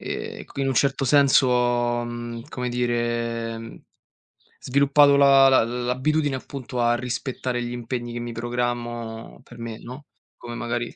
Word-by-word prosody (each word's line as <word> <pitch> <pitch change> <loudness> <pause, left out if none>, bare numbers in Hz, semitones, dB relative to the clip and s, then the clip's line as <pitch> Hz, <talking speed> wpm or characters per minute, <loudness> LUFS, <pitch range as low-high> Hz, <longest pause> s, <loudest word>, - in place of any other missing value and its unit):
Ehm, - - -6
qui - - -8
in 135 - 0
un 135 - 0
certo 135 +2 +1
senso 140 -1 +5
ho, 120 -1 +1
mhmm, 120 0 -6
come 125 -1 -4
dire, 120 -1 -2 0.8
sviluppato 140 +1 +4
la 135 -1 +7
la 130 - +5
l'abitudine 130 +5 0
appunto 130 -1 -6
a 120 0 +3
rispettare 125 0 -3
gli 120 0 -4
impegni 120 0 -4
che 120 - -4
mi 120 0 -5
programmo 120 -1 -4
per 120 - -15
me, 115 -1 -6
no, 130 +5 -10 0.3
come 120 0 -8
magari 120 0 -3
120 Hz, 150 wpm, -24 LUFS, 120-130 Hz, 0.8 s, la